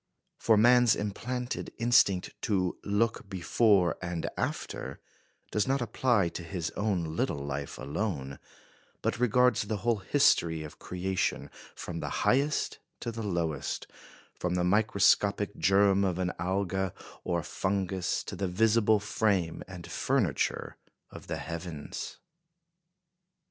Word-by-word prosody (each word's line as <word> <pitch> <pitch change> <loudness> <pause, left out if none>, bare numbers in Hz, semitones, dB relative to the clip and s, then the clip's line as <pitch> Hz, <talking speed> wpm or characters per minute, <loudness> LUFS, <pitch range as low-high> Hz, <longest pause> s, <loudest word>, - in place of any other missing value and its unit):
For 110 -2 +4
man's 120 +1 +6
implanted 120 +5 -4
instinct 115 -6 +3
to 95 -4 0
"look 105 0 0
before 95 0 +3
and 85 -2 -3
after" 65 +1 -4 0.5
does 105 +1 +1
not 135 +1 +2
apply 120 -5 +1
to 85 - -6
his 85 -1 -4
own 90 -7 -1
little - - 0
life 70 0 -4
alone, 70 -6 -3 0.6
but - - 0
regards 125 0 +4
the 110 +1 -2
whole 120 -2 +3
history 90 - +3
of 75 - -10
creation, 95 +1 -2 0.2
from 85 -1 -6
the - - -3 0.2
highest 140 +4 +1 0.2
to 120 - -3
the 115 0 -6
lowest 85 -7 -2 0.5
from 90 0 -2
the 90 - +1
microscopic 100 +1 +3
germ 100 0 +4
of 90 -3 0
an 90 -1 0
alga 95 0 -1 0.3
or 85 -1 0
a - - -12
fungus 95 0 -1
to - - -6
the 100 - -2
visible 110 +3 +3
frame 100 -4 0
and 90 -2 -9
furniture - - 0 0.3
of - - -11
the - - -3
heavens. 85 -3 -6
95 Hz, 130 wpm, -29 LUFS, 90-110 Hz, 0.6 s, man's